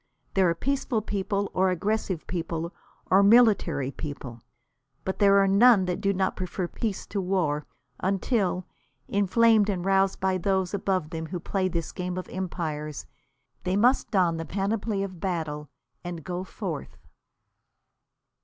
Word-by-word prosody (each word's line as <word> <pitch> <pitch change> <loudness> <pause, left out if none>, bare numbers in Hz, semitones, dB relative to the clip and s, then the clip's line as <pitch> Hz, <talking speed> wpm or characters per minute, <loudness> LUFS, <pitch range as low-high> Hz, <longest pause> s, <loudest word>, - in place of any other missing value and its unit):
There 190 -2 +4
are 170 - +1
peaceful 260 +1 -1
people, 200 0 -2
or 190 0 +3
aggressive 190 -1 -1
people, 170 -1 -3 0.4
or 190 +2 +7
military 200 - +4
people. 140 -6 -7 0.6
But 190 - -3
there 200 -1 +6
are 195 0 +5
none 200 0 +6
that 180 +1 -2
do 200 -1 +2
not 190 -1 0
prefer 185 0 -3
peace 210 +2 -3
to 200 - -3
war, 175 -6 0 0.3
until, 190 -1 0 0.4
inflamed 210 +2 +4
and 185 -3 -2
roused 195 0 +2
by 190 -1 +1
those 190 0 0
above 190 -5 -1
them 160 -1 -4
who 180 +1 -4
play 190 +2 -1
this 170 -3 -3
game 180 0 -4
of 185 - -4
empires, 155 -5 -4 0.6
they 185 +1 0
must 245 +6 +3
don 180 -6 +2
the 165 - -3
panoply 200 +3 -1
of 185 -3 -6
battle 155 -5 -3 0.3
and 175 -3 -6
go 180 0 -4
forth. 185 -6 -6
185 Hz, 145 wpm, -27 LUFS, 170-200 Hz, 0.6 s, or